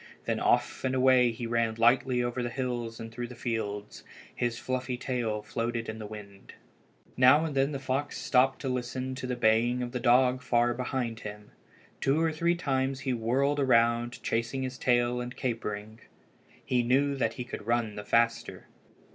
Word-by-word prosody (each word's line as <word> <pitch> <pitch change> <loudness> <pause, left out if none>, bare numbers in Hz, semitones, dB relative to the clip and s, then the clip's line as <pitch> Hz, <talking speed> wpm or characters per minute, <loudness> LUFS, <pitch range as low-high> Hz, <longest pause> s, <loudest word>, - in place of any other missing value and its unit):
Then - - -1
off - - +1
and 130 0 0
away 130 -1 +5
he 115 +1 -5
ran 115 -1 0
lightly 125 +2 +3
over 120 +1 -2
the 120 - -2
hills 120 -2 -3
and 115 0 -7
through 120 +1 -5
the 125 - -10
fields. 105 -4 -4 0.3
His 120 -1 -2
fluffy 130 0 -3
tail 120 -5 -2
floated 115 +1 -3
in 110 0 -5
the 105 - -6
wind. 100 -2 -11 0.6
Now 130 +5 +6
and 155 - -3
then 135 +1 +1
the 140 - -3
fox 135 +2 -2
stopped 130 +1 +2
to 135 - -3
listen 130 +1 -3
to 130 0 -5
the 125 - -2
baying 120 +2 +2
of 120 - -5
the 125 - -3
dog 125 +1 +4
far 120 -1 +2
behind 125 -2 -3
him. 105 -1 -9 0.5
Two 135 +3 +2
or 165 0 +2
three 170 +2 +1
times 135 -4 -1
he 130 - -1
whirled 130 +5 +1
around, 120 -2 +2
chasing 115 +4 -1
his 130 -1 -5
tail 120 0 +2
and 125 0 -6
capering. 110 -3 -4 0.7
He 125 -1 +2
knew 135 +4 +2
that 115 -3 0
he 125 - -5
could 115 -3 -8
run 115 -2 +1
the 105 - -7
faster. 115 +2 0
120 Hz, 180 wpm, -29 LUFS, 115-130 Hz, 0.7 s, Now